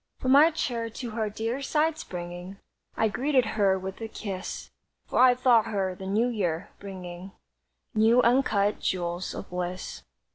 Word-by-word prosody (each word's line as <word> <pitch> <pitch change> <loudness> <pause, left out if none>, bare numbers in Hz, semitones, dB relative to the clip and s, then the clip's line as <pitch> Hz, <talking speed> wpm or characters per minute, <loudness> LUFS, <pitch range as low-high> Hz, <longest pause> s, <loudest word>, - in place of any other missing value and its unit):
From 255 - 0
my 290 +4 +8
chair 240 -8 -2
to 235 +1 -6
her 220 -1 -1
dear 225 +5 -3
side 305 +3 +1
springing, 175 +2 -7 0.4
I 220 - +3
greeted 260 +3 +1
her 195 -3 +3
with 190 +2 -7
a 225 - -3
kiss, 195 -4 -6 0.3
For - - -1
I 255 -1 +7
thought 245 -3 +4
her 195 -4 -1
the 190 +1 -8
New 215 +5 +2
Year, 190 -7 -2
bringing 185 -1 -8 0.6
New 225 +2 +5
uncut 225 -5 +2
jewels 175 0 -2
of - - -8
bliss. 180 0 -4
215 Hz, 155 wpm, -27 LUFS, 185-245 Hz, 0.6 s, my